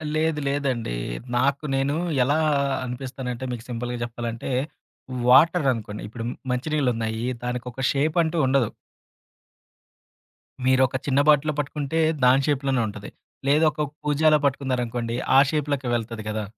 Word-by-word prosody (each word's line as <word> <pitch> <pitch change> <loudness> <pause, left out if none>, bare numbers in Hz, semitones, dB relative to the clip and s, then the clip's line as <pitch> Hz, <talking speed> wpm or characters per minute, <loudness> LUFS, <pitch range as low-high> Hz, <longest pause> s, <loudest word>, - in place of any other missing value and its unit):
లేదు. 155 -1 +1
లేదండి. 130 - -1 0.4
నాకు 140 +3 +1
నేను 135 +2 0 0.3
ఎలా 145 +4 +2 0.5
అనిపిస్తానంటే 125 0 -5
మీకు 120 -2 -5
సింపుల్‌గా 120 0 -3
చెప్పాలంటే, 120 +1 -5 0.8
వాటర్ 155 +4 +6
అనుకోండి. 105 -2 -6
ఇప్పుడు 115 +2 -7 0.3
మంచి 125 +4 -2
నీళ్లున్నాయి, 115 -5 0 0.2
దానికొక 125 +1 -4
షేపంటూ 160 +3 +1
ఉండదు. 130 -4 +2 1.9
మీరు 130 0 +4
ఒక 130 - -8
చిన్న 140 -1 +2
బాటిలు 150 +1 +4
పట్టుకుంటే 145 +2 -2 0.2
దాని 130 +2 +5
షేప్‌లోనే 135 -3 +1
ఉంటది. 105 0 -8 0.4
లేదూ 150 +3 +4
ఒక 150 -1 -2 0.2
కూజాలో 150 +1 +4
పట్టుకున్నారనుకోండి 125 -4 -1 0.2
ఆ - - +10
షేప్‌లోకి 145 -4 -1
వెళ్తది 115 -2 -4
గదా! 110 0 -2
130 Hz, 120 wpm, -24 LUFS, 120-145 Hz, 1.9 s, ఆ